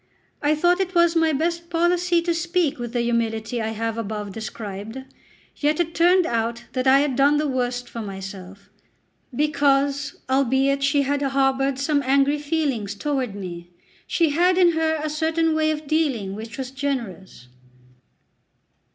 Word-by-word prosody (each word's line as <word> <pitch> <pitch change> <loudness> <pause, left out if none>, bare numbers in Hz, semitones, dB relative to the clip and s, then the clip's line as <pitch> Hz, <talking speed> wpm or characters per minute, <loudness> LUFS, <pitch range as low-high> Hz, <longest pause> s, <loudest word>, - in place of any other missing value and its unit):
I 295 +1 +2
thought 350 +4 +2
it 375 -1 -2
was 340 0 +4
my 325 -1 +3
best 335 +3 -2
policy 345 0 +2
to 340 0 0
speak 335 -3 0
with 240 -1 -5
the 240 - +1
humility 230 0 -1
I 220 - -2
have 225 +1 -3
above 210 -2 -4
described; 215 +1 -7 0.6
yet 300 +2 +1
it 335 -1 0
turned 355 +2 +4
out 230 -1 -2
that 255 0 -1
I 270 +1 +6
had 285 -3 0
done 280 +3 +4
the 300 0 0
worst 245 -2 -2
for 230 - -7
myself, 195 -1 -9 0.6
because, 285 0 +1
albeit 270 +1 +2
she 280 +1 +2
had 285 +1 -1
harboured 270 -1 +1
some 285 +1 +1
angry 275 +2 +2
feelings 285 -9 -2
toward 265 -4 -2
me, 175 -3 -7 0.4
she 330 -3 +2
had 355 +4 +3
in 355 -2 +5
her 320 -1 +1
a - - -1
certain 320 +1 0
way 315 0 +1
of 310 0 -3
dealing 275 -11 0
which 220 +2 -8
was 265 -1 -5
generous. 235 - -5
275 Hz, 160 wpm, -23 LUFS, 230-315 Hz, 0.6 s, I